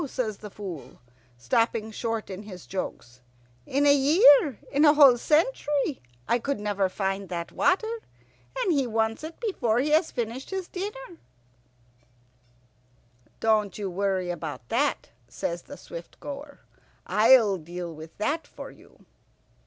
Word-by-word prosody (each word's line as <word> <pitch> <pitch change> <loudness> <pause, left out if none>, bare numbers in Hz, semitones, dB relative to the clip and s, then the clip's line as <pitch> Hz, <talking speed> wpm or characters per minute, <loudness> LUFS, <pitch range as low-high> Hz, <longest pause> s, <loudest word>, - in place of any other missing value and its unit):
says 225 -6 -3
the 210 - -9
Fool, 175 -11 -8 0.4
stopping 220 - 0
short 225 -1 -3
in 190 +1 -6
his 190 -4 -10
jokes. 125 -9 -6 0.5
"In 280 +2 +1
a 285 - +7
year, 285 - +6
in 285 +2 +3
a 300 -1 +7
whole 280 -4 +8
century, 295 - +1 0.3
I 240 - +1 0.2
never 205 -1 0
could 185 - -2
find 195 -1 -2
that 170 -2 -4
water. 440 +5 +1 0.6
And 455 -8 +1
he 275 -4 +1
wants 225 +2 -1
it 320 +1 -8
before 310 - 0
he 285 +5 +1
has 315 +2 +3
finished 240 +2 -4
his 380 -2 -4
dinner." 410 0 -7 2.2
"Don't 215 -3 +1
you 200 -3 -4
worry 190 -1 -1
about 150 -8 -6
that," - - 0 0.2
says 170 +7 -4
the 285 - -11
Swift - - -10
goer, 285 0 -8 0.4
"I'll 220 -3 +5
deal 175 +1 -7
with 160 +1 -12
that 295 +10 -1
for - - -10
you." - - -20
225 Hz, 140 wpm, -26 LUFS, 190-290 Hz, 2.2 s, whole